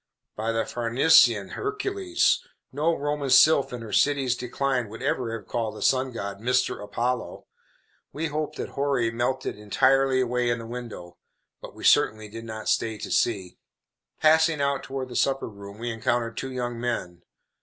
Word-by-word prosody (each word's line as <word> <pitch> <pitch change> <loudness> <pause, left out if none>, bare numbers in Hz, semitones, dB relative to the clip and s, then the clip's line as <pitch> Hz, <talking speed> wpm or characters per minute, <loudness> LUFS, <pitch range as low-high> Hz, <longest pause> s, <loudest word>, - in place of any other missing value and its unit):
By 110 +1 -2
the 115 0 0
Farnesian 120 -3 +4
Hercules! 395 -3 0 0.3
no 155 +5 +1
Roman 145 -1 -2
sylph 140 +2 +6
in 120 -2 -6
her 105 -3 -8
city's 135 -1 +2
decline 125 -1 -2
would 110 - -9
ever 120 -3 -1
have 105 - -15
called 115 -3 -2
the - - -5
sun 130 0 +2
god, 100 -4 -5
Mr. 125 -1 0
Apollo. 120 +4 -3 0.7
We 155 +3 -3
hope 155 0 -3
that - - -5
houri 135 -5 0
melted 120 +1 -2
entirely 130 +5 +3
away 125 -1 0
in 120 - +1
the 115 - -8
window; 115 -7 -8 0.4
but - - -10
we - - -11
certainly 110 0 +3
did 115 +2 -8
not 110 -1 -7
stay 110 -1 0
to - - -7
see. 95 -6 0 0.6
Passing 160 0 +4
out 140 -1 0
toward 135 -1 -5
the 125 - -8
supper 135 +2 +1
room 100 -1 -11
we 120 +2 -4
encountered 115 0 -1
two 130 - -5
young 120 -2 -4
men. 90 -8 -3
125 Hz, 165 wpm, -25 LUFS, 115-135 Hz, 0.7 s, sylph